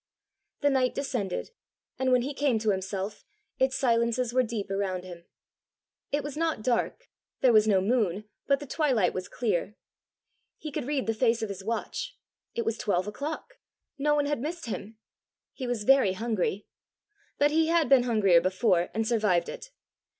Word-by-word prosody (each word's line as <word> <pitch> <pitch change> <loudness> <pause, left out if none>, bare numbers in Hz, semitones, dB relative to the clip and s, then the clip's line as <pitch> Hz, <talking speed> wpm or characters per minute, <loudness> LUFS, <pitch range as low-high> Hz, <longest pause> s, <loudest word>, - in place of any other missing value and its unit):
The 285 - +3
night 255 -2 +1
descended, 245 - -3 0.5
and 260 0 +1
when 250 -1 +4
he 280 +3 -3
came 275 -4 +1
to 215 -1 +1
himself, 195 +1 -4 0.4
its 265 0 +2
silences 235 -1 +1
were 255 - +4
deep 220 -5 -4
around 190 -2 -1
him. 175 -2 -10 0.9
It 290 +1 0
was 290 -2 -5
not 320 -7 -1
dark: 255 - -1 0.3
there 255 -3 +5
was 215 0 +5
no 195 -3 +4
moon, 210 -2 0 0.2
but 275 -1 +3
the 290 - -7
twilight 260 - +1
was 185 0 -4
clear. 210 -4 -1 0.8
He 305 - -7
could 285 -3 -4
read 285 -3 0
the 225 - 0
face 230 0 +1
of 220 - -2
his 195 -1 -6
watch: 230 - -3 0.4
it 235 - -1
was 225 0 -1
twelve 185 -3 0
o'clock! 305 - -6 0.4
No 295 +1 +3
one 290 -1 +2
had 290 -4 -1
missed 330 +4 -4
him! 220 -1 -6 0.6
He 255 - -5
was 240 -3 -2
very 260 -5 +5
hungry! 210 -2 -1 0.7
But 290 +1 +3
he 320 +1 +3
had 330 -2 +3
been 270 -2 +6
hungrier 210 -8 +4
before 185 -1 +2
and 225 0 0
survived 210 -7 +2
it! - - -8
235 Hz, 170 wpm, -28 LUFS, 205-275 Hz, 0.9 s, been